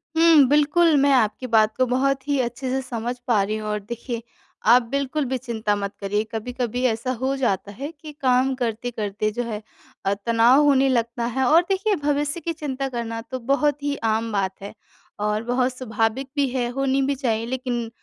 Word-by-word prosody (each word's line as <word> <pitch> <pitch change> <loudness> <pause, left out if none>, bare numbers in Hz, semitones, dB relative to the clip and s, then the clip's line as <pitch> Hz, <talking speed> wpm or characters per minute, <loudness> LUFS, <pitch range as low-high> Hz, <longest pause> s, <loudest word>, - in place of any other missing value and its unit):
हुँ, 325 -4 +6
बिल्कुल 300 +2 +4
मैं 280 - +4
आपकी 250 0 +1
बात 220 -2 +3
को 255 - +3
बहुत 265 +2 0
ही 285 -2 +1
अच्छे 245 +2 -4
से 265 +1 0
समझ 245 -1 -4
पा 225 -5 +3
रही 215 +2 -2
हूँ। 215 0 -5
और 210 0 -1
देखिए 235 +3 -6 0.5
आप 245 +2 +7
बिल्कुल 280 +1 -1
भी 260 0 -1
चिंता 225 -4 -2
मत 200 0 -4
करिए 205 +2 0
कभी-कभी 245 +2 -3
ऐसा 235 +2 0
हो 270 +1 0
जाता 200 -6 -1
है 275 +9 -6
कि 310 - -8
काम 260 +1 +3
करते-करते 220 -3 -2
जो 245 +3 -3
है 215 -2 -5 0.4
अ, 195 - +2
तनाव 230 +6 +4
होने 275 -2 +4
लगता 235 -1 0
है 265 - +1
और 325 +5 +6
देखिए 390 +2 +1
भविष्य 290 +2 0
की 335 0 -3
चिंता 275 -4 -3
करना 230 -2 -4
तो 255 - -3
बहुत 285 +3 0
ही 285 0 0
आम 225 0 0
बात 195 -2 0
है 200 +2 -8 0.5
और 210 +1 0
बहुत 250 +1 0
स्वाभाविक 230 +1 -1
भी 285 -1 +2
है, 245 -1 -1
होनी 270 +1 0
भी 275 +1 0
चाहिए। 230 -4 -1
लेकिन 245 -2 -3
250 Hz, 195 wpm, -23 LUFS, 225-275 Hz, 0.5 s, आप